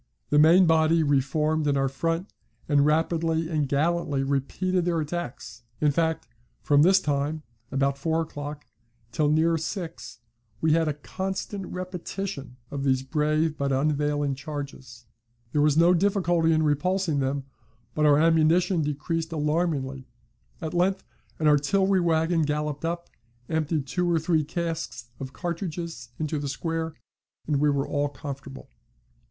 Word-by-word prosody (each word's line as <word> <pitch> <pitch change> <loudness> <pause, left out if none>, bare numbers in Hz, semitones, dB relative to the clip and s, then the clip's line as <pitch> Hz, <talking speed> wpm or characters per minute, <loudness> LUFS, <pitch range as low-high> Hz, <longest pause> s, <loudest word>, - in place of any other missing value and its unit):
The 150 - +5
main 170 +5 +7
body 160 0 +4
re 140 -2 +3
formed 150 +3 0
in 140 -1 +2
our 135 0 +2
front, 165 +7 -2 0.3
and 145 -1 +4
rapidly 160 +1 +1
and 150 -4 0
gallantly 145 -1 +1
repeated 155 +7 0
their 170 -1 0
attacks, 150 -7 -5 0.2
In 150 -1 +3
fact, 160 +1 0 0.4
from 145 -1 +4
this 190 +4 +6
time 150 -1 -1 0.3
(about 140 +1 0
four 160 +3 0
o'clock) 145 -1 -7 0.5
till 150 +2 +1
near 160 +2 +3
six, 165 0 -6 0.4
we 160 - +2
had 165 0 +2
a 150 - -1
constant 190 +4 -4
repetition 180 -6 -5
of 140 -1 -3
these 130 -1 +2
brave 155 +2 +1
but 140 0 0
unavailing 145 +1 +1
charges. 135 -4 -7 0.5
There 150 - +2
was 150 0 +3
no 170 +2 +6
difficulty 175 -3 +2
in 160 0 +3
repulsing 160 +2 +1
them, 135 +1 -1 0.5
but 150 0 +2
our 145 -1 +6
ammunition 165 +3 +3
decreased 160 +3 -2
alarmingly. 150 -4 -1 0.6
At 160 - -3
length 185 +2 +1 0.3
an 155 - +1
artillery 190 +7 +3
wagon 165 0 +2
galloped 150 0 -2
up, 170 +1 -3 0.4
emptied 155 -2 0
two 175 +5 0
or 170 - +3
three 160 -1 +1
casks 155 -7 -4
of 130 -1 -6
cartridges 170 -5 -5
into 155 -1 -2
the 145 -1 -3
square, 160 +3 -3 0.5
and 150 -2 +1
we 150 +1 +3
were 140 -1 0
all 145 0 0
comfortable. 140 -1 -8
155 Hz, 145 wpm, -26 LUFS, 145-165 Hz, 0.6 s, main